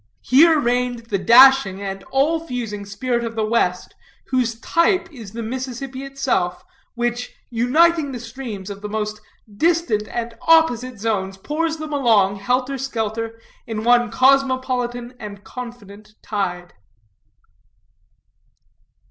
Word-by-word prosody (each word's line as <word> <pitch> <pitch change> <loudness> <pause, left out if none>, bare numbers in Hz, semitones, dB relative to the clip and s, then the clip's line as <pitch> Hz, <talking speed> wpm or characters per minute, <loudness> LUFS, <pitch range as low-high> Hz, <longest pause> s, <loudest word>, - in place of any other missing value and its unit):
Here 315 +4 +5
reigned 245 -2 -1
the 195 - +1
dashing 240 -3 +6
and 195 -1 -5
all 295 +5 +1
fusing 220 -5 -5
spirit 235 +4 -2
of 230 -1 -5
the 220 -1 0
West, 200 -5 0 0.4
whose 240 -3 0
type 335 +7 +2
is 225 -7 -10
the 230 0 -5
Mississippi 260 +2 -5
itself, 270 -10 -2 0.3
which, 240 +1 -2 0.2
uniting 290 +6 +3
the 250 - -5
streams 230 -5 -7
of 200 0 -9
the 210 - -5
most 215 0 -3 0.4
distant 325 -10 +1
and 235 0 -4
opposite 255 -7 +3
zones, 195 -3 -2
pours 320 +9 -2
them 310 -1 -6
along, 215 -8 +3
helter 255 +6 -1
skelter, 230 -3 -3 0.3
in 220 -1 -4
one 240 0 +4
cosmopolitan 255 -2 +1
and 205 -1 -9
confident 215 -4 -10
tide. 180 -4 -3
240 Hz, 120 wpm, -21 LUFS, 215-265 Hz, 0.4 s, dashing